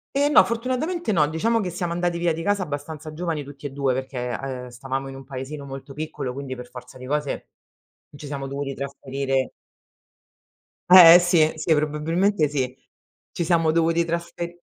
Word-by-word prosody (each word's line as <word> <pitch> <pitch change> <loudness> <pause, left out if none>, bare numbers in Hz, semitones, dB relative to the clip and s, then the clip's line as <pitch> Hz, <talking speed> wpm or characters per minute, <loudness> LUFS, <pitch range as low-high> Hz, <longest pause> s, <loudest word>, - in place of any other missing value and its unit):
Eh, 285 +1 +3
no, - - +7
fortunatamente, 255 +8 -2
no. 155 -5 +3
Diciamo 225 +10 +1
che 190 - -2
siamo 175 0 -3
andati 175 0 -1
via 170 -1 +1
di 165 - -5
casa, 200 +1 +1
abbastanza 150 0 -6
giovani 160 -2 -3
tutti 140 +1 -12
e - - -7
2, 135 -2 0
perché, 125 -2 -3
uhm, 130 -2 -5
stavamo 135 +2 -4
in 135 - -9
un 135 - -9
paesino 140 +2 -7
molto 135 +1 -8
piccolo, 145 -4 -5
quindi 135 -1 -6
per 125 0 -10
forza 125 0 -11
di 130 - -10
cose, 145 +1 -3 0.7
ci 145 - -10
siamo 140 -1 -4
dovuti 140 0 -4
trasferire. 135 -1 -2 1.4
Eh, 175 -2 +11
sì, 175 -3 +3
sì, 160 +1 +1
probabilmente, 155 +4 +1
sì. 130 -3 -2 0.6
Ci 170 - -1
siamo 165 -1 +2
dovuti 165 +1 +2
trasfe 170 +1 -3
e 175 0 -8
150 Hz, 175 wpm, -24 LUFS, 135-170 Hz, 1.4 s, Eh